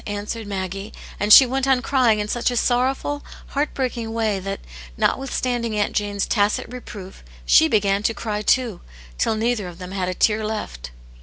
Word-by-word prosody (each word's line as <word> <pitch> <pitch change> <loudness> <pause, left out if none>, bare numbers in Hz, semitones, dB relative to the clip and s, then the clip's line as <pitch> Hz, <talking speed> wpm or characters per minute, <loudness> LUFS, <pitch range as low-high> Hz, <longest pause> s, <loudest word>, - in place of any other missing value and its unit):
answered 210 +2 -4
Maggie^ 195 +1 -4 0.3
and 205 +1 0
she 265 - +11
went 265 +2 -1
on 265 -2 +4
crying 250 -4 +2
in 210 0 -2
such 240 +3 0
a 245 - -2
sorrowful, 260 +4 0 0.3
heart* 290 +1 -1
breaking 240 -4 -2
way 220 -3 0
that, 195 +1 -5 0.4
notwithstanding 245 -4 -1
Aunt 205 - 0
Jane's 205 -1 -1
tacit 205 -1 +1
reproof, 205 -6 -9 0.2
she - - +6
began 200 0 +2
to 225 - 0
cry 210 -2 -3
too, 230 -3 +1 0.4
till 220 - +1
neither 220 -3 -1
of 175 -1 -10
them 180 0 -8
had 185 -2 -2
a 185 - -3
tear 215 +2 +2
left. 135 - -5
215 Hz, 175 wpm, -22 LUFS, 200-245 Hz, 0.4 s, she